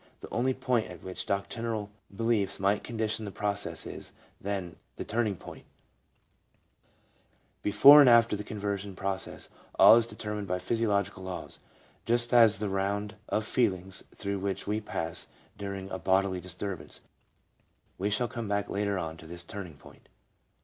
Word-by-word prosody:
The - - -9
only 130 +2 +1
point 125 -3 0
at - - -11
which 95 -1 -5
doctrinal 105 +1 -2 0.2
be 105 +3 -6
liefs 115 -4 +1
might 100 +2 +1
condition 110 -1 -2
the 105 - -4
process 100 +1 -3
is, - - -8 0.3
then, 95 -4 -4 0.2
the - - -6
turning 110 -3 0
point; - - -11 2.0
before 140 +8 +9
and 135 - +7
after 115 -2 +6
the 105 - -5
conversion 100 -2 -4
process 95 0 -4 0.3
all 115 - +9
is 115 -1 +2
determined 105 -3 -5
by 90 0 0
physiological 100 -2 0
laws, 95 -1 -7 0.5
just 120 +1 +2
as 115 -4 +7
the 105 +1 -2
round 100 +2 -1 0.2
of 110 - 0
feelings 95 -6 0
through 100 -1 -3
which 100 0 -3
we 105 +1 -1
pass 80 -5 -3 0.3
during 100 -1 -5
a 95 - -3
bodily 95 0 +1
disturbance. 90 +1 -6 1.0
We 100 +2 0
shall 120 +4 0
come 115 -1 -5
back 100 0 -1
later 100 0 0
on 80 -2 -4
to 80 0 -12
this 85 +1 -7
turning 90 -3 -8
point. 70 - -17
100 Hz, 155 wpm, -29 LUFS, 95-110 Hz, 2.0 s, before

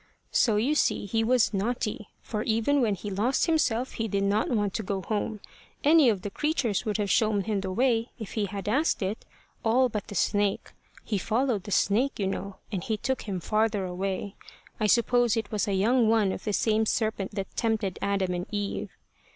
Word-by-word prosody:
"So 225 -4 +3
you 240 +8 +2
see 300 - +1
he 225 +3 0
was 245 -1 +3
naughty; 215 +1 -2
for 210 -2 -3
even 230 +6 +1
when 215 -4 +2
he 205 +2 -6
lost 220 +8 +1
himself 260 -7 +1
he 225 - -3
did 200 -1 0
not 205 +2 +1
want 205 -5 0
to - - -2
go 195 -2 -3
home. 210 +2 -2 0.4
Any 300 -3 +6
of 200 -4 -1
the 205 - -4
creatures 275 - 0
would 215 -1 0
have 205 -2 -1
shown 215 -2 +3
him 205 -1 -1
the 190 -1 -4
way 230 +2 +1
if 220 -5 -7
he 210 -2 -1
had 200 +1 -6
asked 270 +1 +1
it 195 +4 -3 0.4
all 250 +3 +3
but 210 -3 -4
the 205 - -8
snake. 205 +2 0 0.3
He 205 - -1
followed 225 -1 0
the 205 - -7
snake, 230 +9 +2
you 200 - -1
know, 195 0 -3 0.2
and 190 -5 -3
he 220 - -1
took 255 0 -3
him 190 -2 -2
farther 215 +1 0
away. 190 +2 -3 0.4
I 215 - +2
suppose 235 +1 +3
it 220 -2 -3
was 215 0 0
a 200 - 0
young 225 +4 +3
one 220 -4 +3
of - - -6
the 210 - -1
same 220 +1 +2
serpent 215 -3 -1
that 195 -2 -5
tempted 220 -5 -1
Adam 195 -2 0
and 180 +1 -3
Eve. 205 -1 -3
215 Hz, 205 wpm, -27 LUFS, 200-230 Hz, 0.4 s, Any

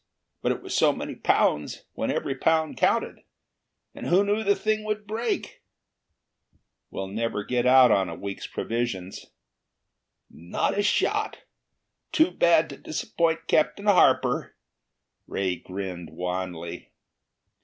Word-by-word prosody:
But - - +1
it - - -4
was - - -4
so - - +5
many - - -5
pounds, 75 - +1
when - - -2
every 135 - -1
pound 160 +3 +1
counted. - - +1 0.7
And - - -7
who 185 +3 +4
knew 205 +2 0
the 200 -1 +3
thing 215 0 -1
would 215 0 -3
break?" 225 +3 -3 1.3
"We'll 95 - -4
never 105 +1 -2
get 125 +2 0
out 130 -2 +7
on 95 -2 +2
a - - -6
week's 100 -1 -6
provisions." 115 -6 -4 1.0
"Not 85 +2 -2
a 205 - +2
shot! 205 - 0 0.7
Too 320 +1 +3
bad 165 -1 +4
to 140 - -9
disappoint 165 -1 -1
Captain 200 +6 +1
Harper." 130 -10 +3 0.7
Ray 95 -2 -1
grinned 90 -3 -6
wanly. 90 0 -5
130 Hz, 125 wpm, -26 LUFS, -, 1.3 s, out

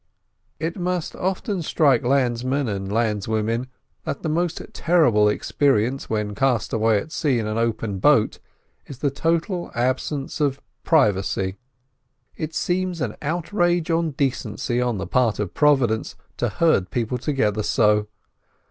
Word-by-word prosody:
It 165 +4 -3
must 180 -1 -2
often 190 +1 -2
strike 145 -6 +3
landsmen 130 +1 +1
and 95 -2 -3
landswomen 110 +2 0 0.4
that - - -4
the 160 - -1
most 170 +2 0
terrible 125 -12 +3
experience 130 +2 0
when 105 -2 -1
cast 120 0 0
away 110 -1 +3
at 130 +10 -5
sea 140 -6 +1
in 110 - -1
an 110 +1 -2
open 110 -4 -1
boat - - +3 0.5
is 140 - -9
the 140 +1 0
total 170 +4 -1
absence 130 +4 -1
of 140 -2 +1 0.2
privacy. 100 - +2 0.8
It 155 0 -5
seems 180 -1 -1
an 125 -6 -2
outrage 175 +2 0
on 165 -2 +1
decency 125 -4 -1
on 120 -3 0
the 90 - -3
part 115 +3 +1
of 100 -5 -3
Providence 135 -7 +2 0.2
to 120 - 0
herd 130 - +2
people 120 +3 -2
together 110 -7 0
so. 105 0 +2
125 Hz, 140 wpm, -23 LUFS, 110-160 Hz, 0.8 s, strike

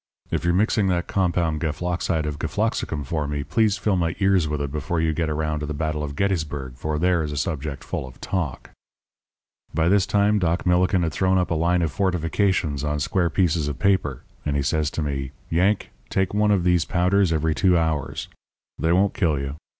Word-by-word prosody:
If - - -1
you're 85 0 +2
mixing 105 0 +2
that 90 -2 0
compound 85 -5 0
gefloxide 85 0 -1
of 75 -1 -4
gefloxicum 75 -3 -1
for 75 +1 -2
me, 75 -1 -2
please 110 +3 +2
fill 100 +1 +1
my 85 0 0
ears 95 -4 +3
with 75 -1 -2
it 70 -1 -3
before 75 +3 -2
you 80 -1 +1
get 80 0 -1
around 75 0 -1
to 75 - -4
the 75 - -4
battle 75 0 -2
of 70 -1 -5
Gettysburg, 75 -8 -1
for 75 +4 -3
there 90 +1 +2
is 75 -2 -3
a 75 - -4
subject 75 -1 -3
full 65 - -4
of 65 - -14
talk.' 85 -9 -3 1.0
"By 80 +1 +3
this 95 -3 +3
time 105 +1 +3
Doc 85 -2 0
Millikin 90 +1 +3
had 80 -2 -1
thrown 95 +2 +2
up 90 -1 0
a - - +3
line 85 +2 +2
of 80 - 0
fortifications 90 -4 0
on 75 0 -1
square 85 +3 +1
pieces 80 -3 +1
of 75 - -3
paper; 90 -10 +1 0.2
and 75 -1 -1
he 70 - +1
says 75 +2 +1
to 80 - -3
me: 70 -2 -3 0.2
'Yank, 95 +5 +1 0.2
take 95 -1 0
one 105 0 +2
of 100 -4 +3
these 90 -2 +3
powders 90 +2 +2
every 80 0 +1
two 90 +5 +3
hours. 80 -4 -1 0.5
They 80 - +1
won't 95 +3 +3
kill 80 -6 +1
you. 70 +1 -4
80 Hz, 205 wpm, -23 LUFS, 75-90 Hz, 1.0 s, ears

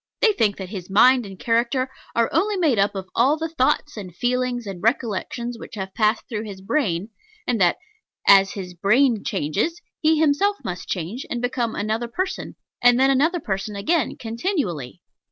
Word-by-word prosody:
They 440 - +4
think 210 - +1
that 190 -2 -7
his 185 -3 -7
mind 245 +3 +5
and 195 -1 -10
character 240 +4 0 0.2
are 230 -1 +3
only 400 +5 +1
made 300 - +2
up 200 +1 +2
of 190 -1 -5
all 270 +6 +3
the 325 +1 -3
thoughts, 295 -1 0
and 185 -5 -8
feelings, 245 +1 -1
and 195 -3 -7
recollections 235 +1 -1
which - - -9
have 190 -2 -5
passed 215 0 +1
through 220 -2 -4
his 200 -3 -8
brain; 195 - -1 0.4
and 235 -5 0
that 175 -1 +4 0.5
as 195 -1 +7
his 185 -3 -6
brain 220 - +2
changes, 200 - -1 0.2
he 315 0 +3
himself 320 +7 +2
must 180 -1 -5
change, 190 +8 -3
and 240 - -2
become 245 -2 -1
another 220 +3 -1
person, 370 +11 -4 0.3
and 245 0 +5
then 270 +1 +5
another 320 +7 +2
person 200 -3 -3
again, 300 +8 0
continually. 225 - -3
230 Hz, 175 wpm, -23 LUFS, 195-270 Hz, 0.5 s, as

